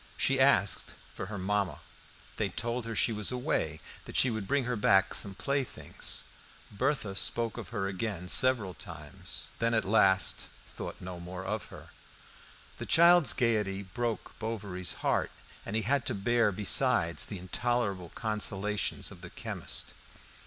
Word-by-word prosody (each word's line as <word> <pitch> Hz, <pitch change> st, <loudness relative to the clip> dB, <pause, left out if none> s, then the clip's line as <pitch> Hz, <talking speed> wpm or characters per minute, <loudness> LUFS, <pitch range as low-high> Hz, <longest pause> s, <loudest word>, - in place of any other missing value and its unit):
She 135 Hz, 0 st, +2 dB
asked 105 Hz, -8 st, +3 dB, 0.2 s
for 95 Hz, -, -5 dB
her 100 Hz, 0 st, -5 dB
mamma. 100 Hz, 0 st, -1 dB, 0.6 s
They -, -, 0 dB
told 120 Hz, 0 st, -3 dB
her 115 Hz, -, -4 dB
she 115 Hz, -, +3 dB
was 105 Hz, +1 st, +1 dB
away; 125 Hz, -, -1 dB, 0.3 s
that -, -, -4 dB
she 130 Hz, -, +5 dB
would 110 Hz, -3 st, -3 dB
bring 140 Hz, -1 st, +2 dB
her 125 Hz, 0 st, -1 dB
back 95 Hz, -2 st, +4 dB
some 100 Hz, -2 st, -1 dB
playthings. 135 Hz, +7 st, -2 dB, 0.5 s
Berthe 110 Hz, -2 st, -1 dB
spoke 115 Hz, +2 st, +1 dB
of -, -, -7 dB
her 100 Hz, -3 st, -2 dB
again 95 Hz, -2 st, -3 dB
several 115 Hz, -3 st, +3 dB
times, 75 Hz, -5 st, -6 dB
then 115 Hz, 0 st, +2 dB
at 110 Hz, -, +2 dB
last 95 Hz, -2 st, +3 dB, 0.2 s
thought -, -, -8 dB
no 90 Hz, -1 st, -6 dB
more 90 Hz, +2 st, -7 dB
of 105 Hz, +2 st, -2 dB
her. -, -, -12 dB, 0.9 s
The -, -, -5 dB
child's 170 Hz, -2 st, +6 dB
gaiety 105 Hz, -5 st, +1 dB
broke 115 Hz, +4 st, -3 dB
Bovary's 100 Hz, -6 st, -3 dB
heart, -, -, +2 dB, 0.4 s
and 105 Hz, -, -3 dB
he 110 Hz, -, +1 dB
had 135 Hz, +3 st, +1 dB
to -, -, 0 dB
bear 115 Hz, +2 st, +2 dB
besides 90 Hz, -4 st, +3 dB
the 100 Hz, -, -5 dB
intolerable 100 Hz, -1 st, -1 dB
consolations 105 Hz, -1 st, -1 dB
of -, -, -12 dB
the -, -, -9 dB
chemist. -, -, -3 dB
105 Hz, 150 wpm, -30 LUFS, 95-120 Hz, 0.9 s, child's